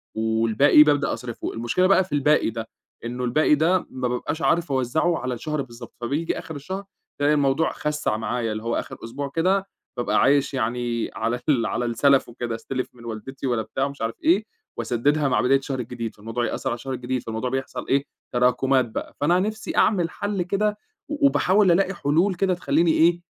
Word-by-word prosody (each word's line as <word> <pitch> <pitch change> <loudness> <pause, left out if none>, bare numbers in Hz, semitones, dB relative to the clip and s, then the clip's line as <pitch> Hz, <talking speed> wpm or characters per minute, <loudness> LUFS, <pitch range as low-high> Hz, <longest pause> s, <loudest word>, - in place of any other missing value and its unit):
والباقي 110 +6 +5
بابدأ 145 -2 +2
أصرفُه، 120 -2 -5
المشكلة 120 +11 +1
بقى 190 -1 +5
في 185 - -15
الباقي 150 -2 +3
ده، 115 0 -5 0.4
إنه 125 +1 -4
الباقي 150 +5 +3
ده 170 +4 +2
ما 130 -1 -3
بابقاش 145 +6 -3
عارف 170 -3 +1
أوزَّعه 135 +7 +1
على 125 0 -3
الشهر 150 +4 -3
بالضبط، 120 -2 -10
فبييجي 145 +7 -1
آخر 160 - -8
الشهر 190 +8 -5 0.4
ألاقي 145 +1 +4
الموضوع 145 +2 +2
خسَّع 150 -7 -1
معايا، 115 0 -2
اللي 110 +1 -4
هو 115 0 -1
آخر - - -7
أسبوع 135 +5 -5
كده 190 +4 +2 0.3
بابقى 120 - +1
عايش 140 0 +3
يعني 120 -1 -1
على 115 +4 -1
ال 120 -6 +3
على 120 - -1
السَلف 130 +4 +3
وكده، 120 -1 -4
أستلِف 130 +3 -4
من 120 -1 -14
والدتي 115 +5 -6
ولا 120 -3 +1
بتاع 130 +6 -2
مش 140 -3 -10
عارف 115 0 -2
إيه، 195 +6 +3 0.3
وأسدِّدها 135 +6 +1
مع 130 - +2
بداية 135 +1 +4
الشهر 135 -1 -4
الجديد، 115 -1 -5
فالموضوع 115 +3 -3
يأثَّر - - -2
على 120 - -1
الشهر 130 +2 -6
الجديد، 125 0 -3
فالموضوع 115 +3 -3
بيحصل 135 +1 -4
إيه 140 +1 +2 0.3
تراكمات 125 +1 +3
بقى، - - -6
فأنا 175 +5 +3
نفسي 215 +2 -3
أعمِل 175 -6 +3
حلّ 205 -1 -3
كده 210 +4 0 0.3
و 290 -2 +1
وباحاول 195 -6 +3
ألاقي 195 +2 +2
حلول 175 +4 +1
كده 185 0 +1
تخليني 165 -1 +2
إيه، 170 +2 +3
135 Hz, 190 wpm, -24 LUFS, 120-165 Hz, 0.4 s, والباقي